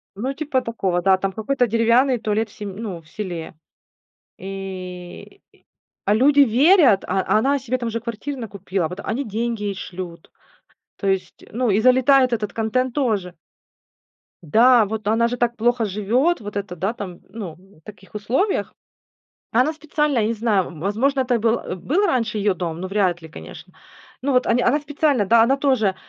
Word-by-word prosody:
Ну, 260 +7 -3
типа 280 -3 -1
такого, 190 -7 -1
да, 190 0 +4
там 195 0 -2
какой-то 245 +5 0
деревянный 235 +4 +3
туалет 215 +1 -1
в - - -18
сем 200 -3 -7
ну, 195 -6 -6
в 155 - -24
селе. 175 -4 -6 0.8
И, 190 - -8 0.6
а 205 - +3
люди 280 +5 +5
верят, 270 - +5
а 190 +1 +1
а 195 +3 +1
она 275 +5 +2
себе 255 0 -2
там 240 -2 -4
уже 230 +1 -2
квартир 240 +5 -5
накупила, 195 -6 -3
вот 180 +3 -8
они 270 +5 -2
деньги 225 0 -3
ей 200 -1 -2
шлют, 175 -3 -8 0.7
то 200 - -5
есть, 190 -1 -2
ну, 240 -1 0
и 205 +3 +3
залетает 255 +1 +4
этот 210 -3 -2
контент 240 +3 -1
тоже. 210 -11 -1 1.1
Да, 230 - +5
вот 215 0 -5
она 230 +2 +3
же 245 - -3
так 240 0 0
плохо 240 0 +1
живет, 230 - +1
вот 205 -1 -8
это 195 -3 -4
да, 195 +7 -2
там, 190 -7 -8
ну, 195 -8 -7
в 185 -2 -22
таких 195 +2 -15
условиях. 265 - -1 0.8
Она 255 +7 +2
специально, 300 -4 -1
я 215 - +1
не 230 - 0
знаю, 215 -4 +1
м, 165 -4 -11
возможно, 260 +8 +1
это 245 -2 +1
был, 230 +1 +2
а, - - -6
был 335 - 0
раньше 230 - 0
ее 205 -1 +2
дом, 170 -2 -4
но 185 - -4
вряд 185 -4 0
ли, 160 - -11
конечно. - - -11 0.5
Ну 275 0 0
вот 250 - +3
они 245 +1 +2
она 280 +6 +2
специально, 290 -6 0
да, 230 +3 +5
она 270 +4 +2
тоже, 245 -9 +1
220 Hz, 180 wpm, -21 LUFS, 195-255 Hz, 1.1 s, люди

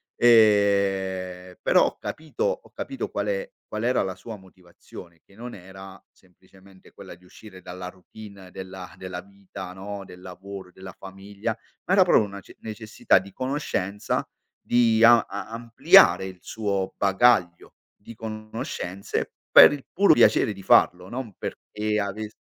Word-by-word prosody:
ehm, 95 -5 +2
però - - +4
ho - - -7
capito 155 - -6
ho - - -2
capito - - -5
qual'è - - -3 0.2
qual 110 +1 -5
era 125 +1 +1
la 95 -1 -4
sua 110 +3 -10
motivazione, 90 -2 -15
che - - -23
non 120 +4 -9
era 95 +1 -12
semplicemente 95 +1 -22
quella - - -12
di 90 +1 -24
uscire 95 0 -14
dalla 90 0 -7
routine 95 0 -14
della 95 -1 -9
della 90 -1 -7
vita 100 -1 -10
no, 100 +1 -8
del 90 0 -14
lavoro, 95 +1 -10
della 95 0 -11
famiglia 100 +3 -6 0.3
ma 185 - 0
era 195 - +7
proprio 175 -10 +4
una 100 -1 -7
ce - - -17
necessità 110 -1 0
di 95 +1 -5
conoscenza 130 -7 -3 0.3
di 115 -2 +2
a 120 0 +8
a - - -6
ampliare 115 -6 +5
il 95 -1 -10
suo 100 -2 -3
bagaglio 95 -3 +2 0.2
di 110 +3 -13
conoscenze 110 -3 -5 0.2
per - - +10
il 145 -2 -7
puro 195 -2 +5
piacere 110 - +4
di 100 - -12
farlo, 90 -1 +3
non 120 -2 -6
perché 105 0 -4
avess 105 +1 -4
100 Hz, 145 wpm, -24 LUFS, 95-110 Hz, 0.3 s, per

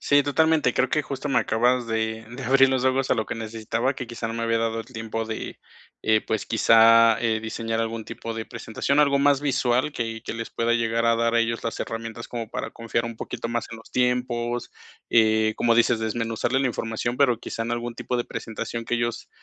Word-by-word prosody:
Sí, 145 0 +4
totalmente. 155 -2 +2
Creo 130 - +2
que 150 +4 +1
justo 140 0 -5
me 135 - +3
acabas 120 +1 +1
de 110 0 -2
de 125 +3 -7
abrir 135 +1 +5
los 130 -1 0
ojos 130 0 +1
a - - +5
lo 110 -3 -2
que - - -4
necesitaba, 115 +3 -2
que 125 - -6
quizá 115 0 -5
no 115 - -4
me 115 - -3
había 115 0 +1
dado 115 0 -1
el - - -10
tiempo 115 -2 -4
de, 110 0 -6 0.4
eh, 110 -1 +3
pues, 110 -2 -3
quizá, 115 0 +6
eh, 115 -2 +1
diseñar 115 0 -3
algún 115 0 -3
tipo 115 - -6
de 110 -1 -4
presentación, 140 +6 -2
algo 140 -1 +4
más 140 0 +3
visual 130 -1 +1
que 115 -3 -4
que - - -4
les 115 0 -5
pueda 115 0 0
llegar 115 0 +1
a 115 - +4
dar 115 0 +1
a 115 - +4
ellos 115 0 -1
las 115 - -3
herramientas 115 0 -5
como 115 -2 -5
para - - -4
confiar 115 0 -2
un 115 -1 -6
poquito 115 - -5
más 120 0 -2
en 115 - -7
los 115 - -16
tiempos. 125 -1 -1 0.4
Eh, 110 -1 +4
como 115 -1 +3
dices, 120 0 +3
desmenuzarle 115 +3 -1
la 135 - +2
información, 115 +1 -3
pero 125 -5 +3
quizá 115 - -5
en 115 - -4
algún 120 0 -3
tipo 125 - -3
de 120 - -1
presentación 115 +1 -5
que 120 - -1
ellos, 120 0 -2
115 Hz, 220 wpm, -24 LUFS, 115-125 Hz, 0.4 s, quizá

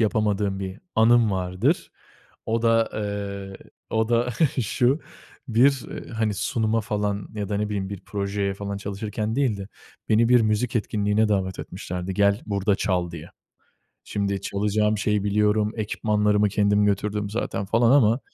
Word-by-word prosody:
yapamadığım 105 -2 +1
bir 95 0 -5 0.2
anım 115 0 +5
vardır. 95 - 0 0.6
O 115 +1 0
da, 115 -1 +3
eee, 100 -2 -4 0.3
o 110 0 +1
da 120 +1 +2 0.3
şu: 125 +7 +1 0.5
Bir, 130 +3 +3
eee, - - -7
hani, 110 -2 -1
sunuma 110 +3 0
falan 105 -2 -2
ya 105 -2 -3
da 100 - -1
ne 105 +1 0
bileyim 100 -2 -3
bir 100 -2 -6
projeye 100 -1 -2
falan 100 0 -5
çalışırken 105 +2 -4
değil 130 -7 +1
de, 100 0 -7 0.4
beni 115 +2 +4
bir 125 -1 +6
müzik 110 +2 +1
etkinliğine 105 0 +1
davet 95 -3 -1
etmişlerdi, 90 +1 -5
"Gel, 100 +2 +3
burada 100 -1 +1
çal." 90 -3 0
diye. 85 0 -9 0.7
Şimdi 100 -1 -2
çalacağım 105 +2 0
şeyi 105 0 0
biliyorum, 105 +1 +2
ekipmanlarımı 105 -1 +1
kendim 105 +1 +2
götürdüm 105 0 -1
zaten 105 -2 -2
falan 115 +3 +3
ama 120 -3 +4
105 Hz, 145 wpm, -24 LUFS, 100-110 Hz, 0.7 s, bir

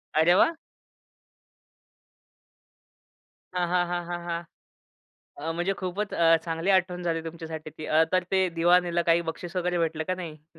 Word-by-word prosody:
अरे 160 +3 +5
वाह! 330 - +4 3.0
हां, 180 -1 0
हां, 175 0 +2
हां, 175 0 -3
हां, 175 0 -4
हां. 170 -1 -1 1.0
अ, 160 +3 -3
म्हणजे 175 +3 0
खूपच 195 +3 -3
अ, 165 -1 +5
चांगली 165 +2 -2
आठवण 180 -1 +1
झाली 165 -1 -1
तुमच्यासाठी 160 -1 -7
ती, 155 - -6
अ, 160 +1 +4
तर 185 -1 +2
ते 190 -1 +3
दिवा 175 +2 +6
नेला 175 -1 -1
काही 170 +1 +5
बक्षीस 175 +2 -10
वगैरे 180 -1 0
भेटलं 160 -1 -1
का 185 - 0
नाही? 175 -3 -6
हं. 150 - -34
175 Hz, 160 wpm, -27 LUFS, 165-180 Hz, 3.0 s, दिवा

